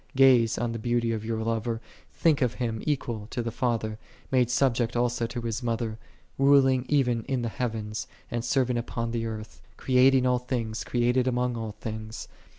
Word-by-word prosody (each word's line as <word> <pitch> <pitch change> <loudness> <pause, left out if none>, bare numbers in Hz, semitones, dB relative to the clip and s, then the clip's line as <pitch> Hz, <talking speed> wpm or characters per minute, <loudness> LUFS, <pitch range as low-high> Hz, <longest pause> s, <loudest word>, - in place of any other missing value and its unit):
Ga/.e 130 -4 +6
on 120 0 -1
the 115 - -4
Beauty 120 0 0
of 110 -2 -2
your 110 0 -2
Lover: 115 0 -1 0.3
think 155 -4 +2
of 125 -2 +1
Him 115 -3 -2
equal 120 -7 -2
to 120 - -3
the 115 - -3
Father, 110 -3 -1 0.3
made 125 -2 +3
sub 130 0 +3
ject 115 -1 -1
also 120 -1 +1
to 120 +1 -5
His 115 0 -3
Mother: 115 -2 -2 0.4
ruling 135 -2 +5
even 125 -5 +2
in 130 -3 -1
the 115 - -1
heavens, 110 -2 -3 0.2
and 120 -1 -2
serving 125 -1 +1
upon 115 0 -3
the 115 -1 -2
earth: 110 -1 -7 0.2
creating 130 0 +4
all 125 -1 +3
things, 115 -3 -3
created 125 +1 +1
among 125 -1 0
all 110 -2 -4
things. 110 0 -6
120 Hz, 180 wpm, -27 LUFS, 115-125 Hz, 0.4 s, Ga/.e